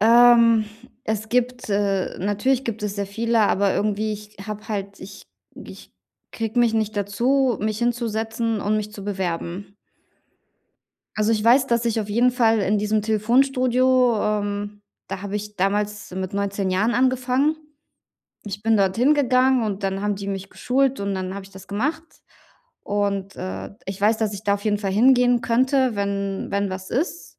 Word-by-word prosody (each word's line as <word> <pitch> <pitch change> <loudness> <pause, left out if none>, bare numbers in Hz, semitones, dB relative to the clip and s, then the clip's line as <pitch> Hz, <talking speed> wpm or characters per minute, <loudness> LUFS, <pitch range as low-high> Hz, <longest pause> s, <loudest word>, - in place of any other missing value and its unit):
Ähm, 230 0 +6 0.4
es 220 0 -3
gibt 250 -1 -1
äh, 200 -2 0
natürlich 210 +8 0
gibt 225 -3 -4
es 205 -1 -3
sehr 200 -1 -2
viele, 230 +3 0
aber 200 -1 +2
irgendwie 215 +1 -1
ich 210 0 -10
habe 210 +1 -7
halt 200 -1 -5
ich 195 +1 -11 0.3
g - - -10
ich - - -15 0.4
kriege 225 +1 -3
mich 230 -2 +3
nicht 215 -1 -1
dazu, 240 +5 +1
mich 215 0 -1
hinzusetzen 230 -2 -1
und 210 +2 0
mich 210 0 -4
zu 200 - -9
bewerben. 190 0 -4 1.4
Also, 215 +1 +1
ich 215 -1 -1
weiß, 260 +3 +5
dass 235 0 +1
ich 230 -1 0
auf 210 - -4
jeden 240 +4 +3
Fall 225 -3 +3
in 205 +1 +1
diesem 210 +1 0
Telefonstudio 250 +2 +2
ähm, 205 0 -2 0.3
da 195 -1 -5
habe 200 0 -4
ich 210 0 -6
damals 205 +2 -1
mit 185 +1 -5
19 200 -1 -1
Jahren 205 +6 +1
angefangen. 255 +4 +1 0.9
Ich 205 0 -6
bin 225 0 +3
dorthin 225 +9 +3
gegangen 260 -2 +3
und 205 -1 -3
dann 195 0 -2
haben 205 -1 0
die 200 0 -7
mich 195 0 -5
geschult 265 -2 0
und 200 -1 -2
dann 185 0 -4
habe 200 -1 -7
ich 195 - -15
das 190 0 -13
gemacht. 270 +11 -2 0.8
Und, 200 -1 -2
äh, 95 +1 -6 0.2
ich 195 0 -5
weiß, 215 +2 +3
dass 215 -2 -1
ich 200 +1 -9
da 200 -1 +2
auf 205 - -6
jeden 210 -1 +2
Fall 195 -2 -2
hingehen 245 +2 +4
könnte, 255 +1 +2
wenn 200 -1 -2
wenn 200 0 0
was 185 0 -7
ist. 340 +6 -2
210 Hz, 175 wpm, -22 LUFS, 200-240 Hz, 1.4 s, Ähm